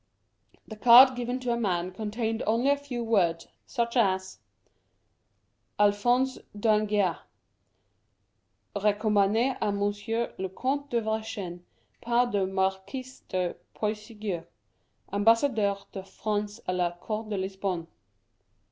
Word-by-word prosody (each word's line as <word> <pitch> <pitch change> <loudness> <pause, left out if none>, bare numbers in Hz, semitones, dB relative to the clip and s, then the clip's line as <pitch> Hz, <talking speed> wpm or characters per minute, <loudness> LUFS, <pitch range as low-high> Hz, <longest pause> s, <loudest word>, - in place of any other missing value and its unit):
The 220 - -9
card 250 +3 +8
given 245 +1 -2
to 250 -1 -1
a - - -1
man 180 -4 -1
contained 220 +3 -3
only 235 +6 +3
a - - +4
few 275 -4 -5
words, 175 -7 +1 0.2
such 235 -1 -2
as: 190 -5 +1 1.4
ALPHONSE 240 +6 +2 0.2
D'ANGEHA. 210 -4 +2 1.6
Recommand^ 210 +4 +2
k - - 0
Monsieur 205 +3 -2
le 190 0 -2
Comte 275 +8 -2
de 235 -1 +1
Vergennes, 220 -5 -4 0.4
par 240 +1 +2
le 200 -3 +1
Marquis 190 +6 -2 0.2
de 180 -1 -1 0.2
Puysegur, 210 -4 -4 0.7
Ambassadeur 210 -1 +2
de 195 - -6
France 210 +2 -3
k 185 - -1
la 175 -1 0
Cour 215 +4 -4
de 210 -2 -3
Lisbonne. 190 -2 -3
210 Hz, 110 wpm, -28 LUFS, 195-235 Hz, 1.6 s, card